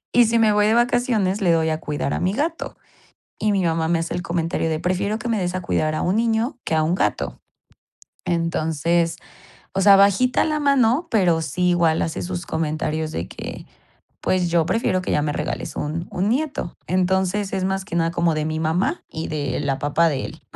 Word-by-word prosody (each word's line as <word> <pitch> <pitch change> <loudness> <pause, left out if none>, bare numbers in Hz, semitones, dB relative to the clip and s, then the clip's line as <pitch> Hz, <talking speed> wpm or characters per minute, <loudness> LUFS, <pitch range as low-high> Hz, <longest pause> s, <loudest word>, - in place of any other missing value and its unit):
Y 245 - +7
si 230 +1 +2
me 215 -2 +4
voy 210 0 +3
de 220 - +3
vacaciones 240 -5 +1
le 175 -3 +3
doy 160 -1 +2
a 155 0 -1
cuidar 145 -1 -3
a - - -1
mi 185 +2 0
gato, 320 +6 -3 0.6
y 210 -1 +1
mi 195 -2 +1
mamá 165 -1 +1
me 170 -1 +2
hace 165 - -3
el 175 - -2
comentario 165 -1 -1
de: 155 0 -1
"Prefiero 190 +4 -1
que 240 - -5
me 225 -2 +1
des 180 -1 -2
a - - -2
cuidar 155 -2 0
a - - -1
un 185 +4 +1
niño 230 +2 0
que 160 - -1
a 155 - +3
un 170 +3 +1
gato". - - -1 0.9
Entonces, 165 0 0 0.6
o 195 - +1
sea, 200 0 +8
bajita 200 +6 +4
la 305 -1 -1
mano, 280 +2 +2
pero 175 -7 +2
sí 180 +3 0
igual 170 -2 +2
hace 160 - -3
sus 175 -1 -4
comentarios 155 0 -2
de 85 - -3
que, - - -8 0.5
pues 180 -2 +1
yo 165 -1 +3
prefiero 185 -5 0
que - - -4
ya 150 - +2
me 150 -1 -1
regales - - -4
un 160 +4 -3
un 190 +3 -1
nieto. 270 - -2
Entonces 190 +2 +1
es 185 -1 -1
más 190 0 -1
que 170 - -4
nada 165 0 +2
como 170 -2 +1
de 155 0 -1
mi 155 0 -2
mamá 180 - 0
y 160 0 -4
de 145 -3 -2
la 135 -2 -1
papá 160 +3 +2
de 135 -2 -2
él, - - -12
180 Hz, 215 wpm, -22 LUFS, 160-210 Hz, 0.9 s, sea